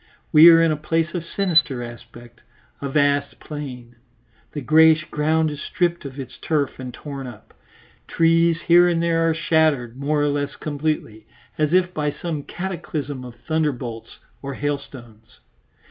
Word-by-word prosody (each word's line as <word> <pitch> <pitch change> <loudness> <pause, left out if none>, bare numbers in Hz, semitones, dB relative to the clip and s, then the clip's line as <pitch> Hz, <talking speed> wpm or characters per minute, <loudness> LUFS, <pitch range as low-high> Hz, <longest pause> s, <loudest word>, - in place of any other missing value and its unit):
We 155 +3 +9
are 165 -1 +7
in 165 -1 +3
a 155 - -1
place 165 +2 -1
of 175 -3 -3
sinister 155 -8 +1
aspect, 120 0 -12 0.4
a 140 - -3
vast 145 0 +1
plain; 125 -5 -8 0.5
the 150 - -5
greyish 155 +3 +5
ground 155 +1 +1
is 150 0 -7
stripped 175 -3 -1
of 140 0 -8
its 130 -1 -8
turf 145 -5 -1
and 130 -1 -6
torn 135 0 -8
up; 110 -3 -13 0.5
trees 165 0 +2
here 175 +1 +5
and 170 -1 +1
there 165 -1 +2
are 160 - 0
shattered 150 -6 +1
more 145 +2 0
or 145 - +2
less 145 0 -2
completely, 145 -7 -4 0.3
as 150 -1 +1
if 180 0 +2
by 150 -2 -1
some 155 0 -5
cataclysm 155 -6 -5
of 125 -1 -10
thunderbolts 135 -8 -3 0.2
or 140 -1 -6
hailstones. 130 -6 -6
150 Hz, 155 wpm, -22 LUFS, 135-165 Hz, 0.5 s, We